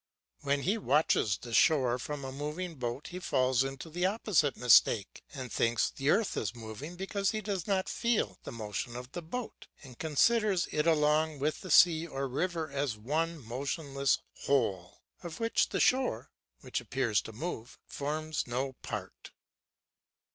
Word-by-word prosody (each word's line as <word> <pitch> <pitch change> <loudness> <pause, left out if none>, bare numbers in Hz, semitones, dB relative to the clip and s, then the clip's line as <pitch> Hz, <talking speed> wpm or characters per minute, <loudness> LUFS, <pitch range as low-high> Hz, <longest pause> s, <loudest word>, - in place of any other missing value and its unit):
When 140 -1 0
he 210 +5 +1
watches 140 - +2
the 120 +2 -9
shore 125 -3 +4
from 145 +2 -5
a 130 - -5
moving 150 +6 -4
boat 125 0 -4
he 180 - -6
falls 130 -6 +2
into 135 +3 -6
the 175 +3 0
opposite 190 - +1
mistake 115 -3 +4
and 130 -5 -7
thinks 115 0 +1
the 135 +2 -2
earth 210 +4 +2
is 105 +2 -2
moving 115 +9 -8
because 195 +1 -1
he 215 - -1
does 195 -4 -3
not 190 -2 +1
feel 235 -2 0
the - - -7
motion 115 +1 -4
of 125 +1 -8
the 175 - -5
boat 225 +9 -6 0.2
and 130 -4 -13
considers 195 +5 +2
it 150 +1 0
along 155 -1 +3
with 150 +3 -1
the 185 - -8
sea 165 0 +6
or 135 -2 -3
river 165 +4 -2
as 140 -5 -1
one 155 +5 -2
motionless 140 +3 -1 0.3
whole, 100 -10 0 0.2
of 170 -2 -7
which 230 0 +1
the - - -1
shore, 250 - +2 0.3
which - - -3
appears 120 -6 0
to - - -9
move, 125 -1 -6
forms 155 +1 -3
no 130 +3 -2
part. - - -7
145 Hz, 160 wpm, -31 LUFS, 125-175 Hz, 0.3 s, sea